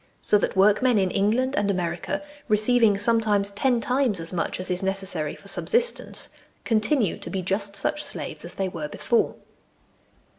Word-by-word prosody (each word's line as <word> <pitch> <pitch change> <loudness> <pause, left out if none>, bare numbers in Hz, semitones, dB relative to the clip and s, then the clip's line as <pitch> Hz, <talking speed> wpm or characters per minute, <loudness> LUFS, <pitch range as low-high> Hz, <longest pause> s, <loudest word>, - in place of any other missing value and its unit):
So 210 - +3
that - - -1
workmen 210 +5 +4
in 190 -2 +1
England 235 +7 +1
and 205 0 +1
America, 180 +10 -2 0.2
receiving 215 -1 +3
sometimes 205 -2 +2
ten 245 +4 +1
times 250 -4 +1
as 165 +2 -3
much 180 - -2
as 185 0 -4
is 180 +1 -1
necessary 190 -5 -2
for - - -16
subsistence, 475 +1 +1 0.3
continue 220 - +1
to - - -7
be 190 -2 -3
just 200 +2 -2
such 300 +9 -1
slaves - - -5
as - - -9
they 195 - -1
were 165 -5 -5
before. 235 +9 0
205 Hz, 160 wpm, -25 LUFS, 190-240 Hz, 0.3 s, workmen